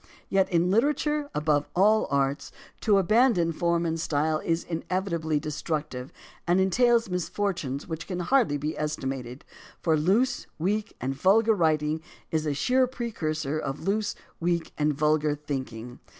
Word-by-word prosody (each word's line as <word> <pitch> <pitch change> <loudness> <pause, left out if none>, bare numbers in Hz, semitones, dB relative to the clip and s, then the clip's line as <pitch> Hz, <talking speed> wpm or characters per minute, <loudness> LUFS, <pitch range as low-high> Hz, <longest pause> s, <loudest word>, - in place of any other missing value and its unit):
Yet, 195 -1 +2
in 175 0 +2
literature 295 +5 +1
above 150 -1 +1
all 210 +4 +4
arts, 140 0 0 0.3
to 210 -3 +3
abandon 200 -3 +3
form 170 +1 +1
and 165 0 -1
style 155 0 0
is 165 +1 -1
inevitably 170 -2 -2
destructive 150 -3 -4 0.4
and 175 +2 +3
entails 230 +5 +3
misfortunes 175 -5 -2
which 165 -1 -5
can 180 -2 -3
hardly 205 - +2
be 150 +2 -3
estimated, 135 -4 -4 0.3
for 165 -2 +2
loose, 215 - +1
weak, 205 +6 -1
and 130 +2 -2
vulgar 210 +10 +4
writing 155 -4 +1 0.3
is 155 -2 0
a 145 - +1
sure 255 - +2
precursor 155 - -3
of 135 +4 -5
loose, 210 +1 0 0.2
weak, 170 0 -1
and 150 -1 +1
vulgar 150 0 +2
thinking. 130 -5 -6
165 Hz, 140 wpm, -27 LUFS, 150-200 Hz, 0.4 s, all